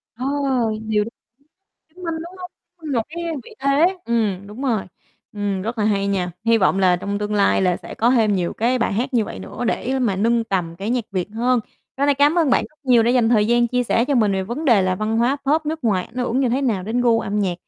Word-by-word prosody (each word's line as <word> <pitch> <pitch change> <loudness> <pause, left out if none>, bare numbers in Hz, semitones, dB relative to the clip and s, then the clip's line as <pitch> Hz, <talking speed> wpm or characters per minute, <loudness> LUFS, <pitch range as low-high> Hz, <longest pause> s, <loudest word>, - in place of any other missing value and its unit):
Ờ, 250 - -5 0.6
điều 210 -1 +2
đ - - -8 0.8
chứng 355 +4 -16
minh, 330 -1 -2
đúng 340 +3 -8
hông? 360 0 -8 0.3
Ưm, 315 -4 -6
một 235 - +1
cái 340 +2 -6 0.2
vị - - -13
thế. 300 +7 +3
Ừm, 210 -5 -1
đúng 215 +7 -9
rồi, 230 -7 0 0.5
ừm, 200 -2 -2
rất 225 +2 -4
là 210 - +1
hay 200 -2 +1
nha. 185 -3 -1
Hy 230 0 +4
vọng 195 -1 +2
là 180 -2 +4
trong 200 +3 -3
tương 210 0 -3
lai 200 -1 +3
là 180 -2 +2
sẽ - - -10
có 235 +2 +2
thêm 220 -5 +3
nhiều 175 -2 -1
cái 245 +3 0
bài 235 - 0
hát 245 +6 -2
như 225 -3 +3
vậy 95 - -8
nữa 95 - -6
để 260 +2 -1
mà 225 -7 0
nâng 230 +3 +1
tầm 180 -6 -2
cái 205 +4 -3
nhạc 245 -3 0
Việt 185 0 -2
hơn. 245 +1 +2 0.4
Tối 280 +1 +1
nay 285 - +4
cám 290 +5 +3
ơn 315 -5 +3
bạn - - +3
rất 305 - -32
nhiều 245 -3 +5
đã 235 - +2
dành 245 -3 +3
thời 215 -3 +3
gian 240 +1 +3
chia 250 0 +1
sẻ 235 0 +1
cho 285 - 0
mình 215 -5 +3
về 190 0 0
vấn 240 +11 -5
đề 230 -9 +5
là 185 0 +1
văn 215 +3 -2
hóa 245 +4 +2
Pop 305 +2 +2
nước 315 -3 -4
ngoài 190 -5 +1
ảnh - - -19
hưởng 250 +1 0
như 255 - +2
thế 260 +4 0
nào 215 -8 0
đến 225 +5 -1
gu 235 -2 +3
âm 205 +1 -2
nhạc, 190 -4 0
230 Hz, 265 wpm, -21 LUFS, 200-260 Hz, 0.8 s, nhiều